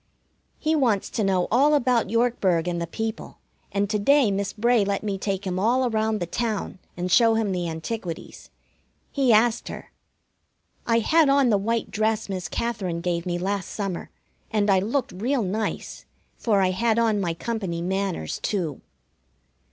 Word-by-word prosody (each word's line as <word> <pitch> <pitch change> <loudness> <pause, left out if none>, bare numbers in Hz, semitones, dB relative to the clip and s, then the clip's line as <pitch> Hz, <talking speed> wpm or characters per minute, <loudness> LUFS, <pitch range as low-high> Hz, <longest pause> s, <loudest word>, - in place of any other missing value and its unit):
He 315 +1 0
wants 235 -9 +1
to 220 - -1
know 190 -2 +1
all 285 +6 +4
about 245 -6 +2
Yorkburg 210 -7 +1
and 170 -1 -2
the 170 - -3
people, 220 +5 -5 0.3
and 200 0 0
to 210 - +1
day 275 +1 +4
Miss 195 0 -1
Bray 235 0 +2
let 200 +1 -1
me 200 -2 -2
take 195 0 -2
him 185 -1 -2
all 245 +5 +2
around 220 -1 0
the 175 - -2
town 210 0 -3 0.2
and 180 +1 -3
show 225 +5 +5
him 220 -3 0
the 175 -2 -2
antiquities. 165 +2 -6 0.6
He 270 -4 +2
asked 225 +2 +3
her. - - -8 1.0
I 230 -1 +3
had 310 +6 +4
on 275 -3 +4
the 205 - +4
white 230 +3 -1
dress 220 0 0
Miss 185 -4 -4
Katherine 195 -6 -2
gave 170 0 -2
me 175 0 -1
last 195 +2 -2
summer, 195 -5 -4 0.4
and 210 -2 +2
I 190 - +5
looked 235 +7 -1
real 240 +6 -1
nice, 210 +3 -3 0.3
for 205 -4 +1
I 185 -1 +2
had 225 +4 +1
on 220 -3 +2
my 170 -3 -1
company 190 -5 -3
manners, 190 - -2
too. 170 -9 -2
210 Hz, 170 wpm, -24 LUFS, 185-230 Hz, 1.0 s, show